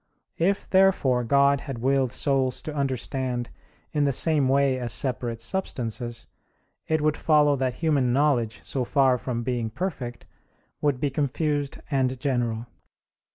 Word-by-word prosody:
If, 195 +4 +1
therefore, 185 -10 +3
God 140 +3 +3
had 135 -5 -6
willed 130 +1 +1
souls 135 -1 0
to 155 - -5
understand 130 -3 -2 0.4
in 150 -2 +1
the 140 - +2
same 145 -1 +3
way 135 -1 +2
as 120 -1 -3
separate 125 -3 -2
substances, 120 - -3 0.6
it 160 -1 +1
would 155 0 +2
follow 150 -2 +3
that 130 -2 -1
human 145 -7 +1
knowledge, 120 -6 +1
so 130 - -2
far 130 -1 +3
from 120 -2 -3
being 120 -2 -2
perfect, 130 - -5 0.6
would 145 -4 +1
be 140 0 0
confused 145 +1 -1
and 130 -2 0
general. 120 -4 -1
135 Hz, 140 wpm, -25 LUFS, 125-145 Hz, 0.6 s, therefore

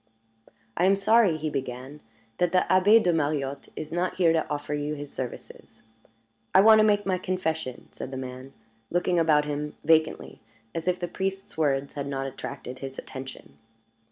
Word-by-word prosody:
"I 175 - +2
am 195 +1 +5
sorry," 200 -3 +4
he 155 0 -3
began, 130 +1 -5 0.4
"that 180 -1 +2
the 180 - +4
Abbé 205 +5 +6
de 175 - +3
Mariotte 145 -3 -1
is 155 - -6
not 175 +1 -1
here 170 -3 +4
to 160 - 0
offer 150 0 -3
you 150 +1 -2
his 145 -1 -8
services 125 -2 -8 0.4
" 115 0 -30
"I 190 - +9
want 220 +1 +8
to - - +6
make 205 -1 +3
my 185 -1 0
confession," 160 -8 -3
said - - -7
the 135 - -6
man, 130 +1 -7 0.4
looking 175 0 +1
about 155 -2 +4
him 150 0 -4
vacantly, 160 0 +2 0.3
as 165 +1 -4
if 180 0 +1
the 175 - -2
priest's 195 +2 -4
words 140 -3 0
had 140 -1 -4
not 135 -1 -3
attracted 130 -1 -7
his 135 0 -7
attention. 130 0 -9
155 Hz, 180 wpm, -26 LUFS, 135-180 Hz, 0.4 s, I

